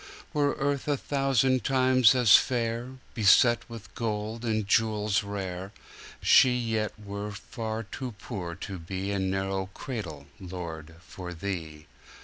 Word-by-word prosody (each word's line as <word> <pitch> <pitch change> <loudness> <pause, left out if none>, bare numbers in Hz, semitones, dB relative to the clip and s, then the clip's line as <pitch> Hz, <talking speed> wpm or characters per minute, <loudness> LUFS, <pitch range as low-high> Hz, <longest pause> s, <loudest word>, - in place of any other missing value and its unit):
Were 145 -2 +2
earth 140 0 -1
a 145 -1 +1
thousand 135 -2 +1
times 130 -2 +4
as 120 -4 +7
fair, 120 0 +1 0.2
Beset 115 +3 +4
with 115 -3 -10
gold 110 0 -3
and 110 -3 -1
jewels 110 -1 +2
rare, 95 -1 -5 0.5
She 125 -1 +6
yet 110 -3 -1
were 100 0 -5
far 110 +2 -5
too 125 +3 -6
poor 100 -7 -6
to 95 0 -7
beA 95 +4 -3
narrow 95 0 -1
cradle, 85 - -6
Lord, 85 -4 -7
for 90 -1 -8
Thee. 80 -4 -5
105 Hz, 125 wpm, -28 LUFS, 95-120 Hz, 0.5 s, as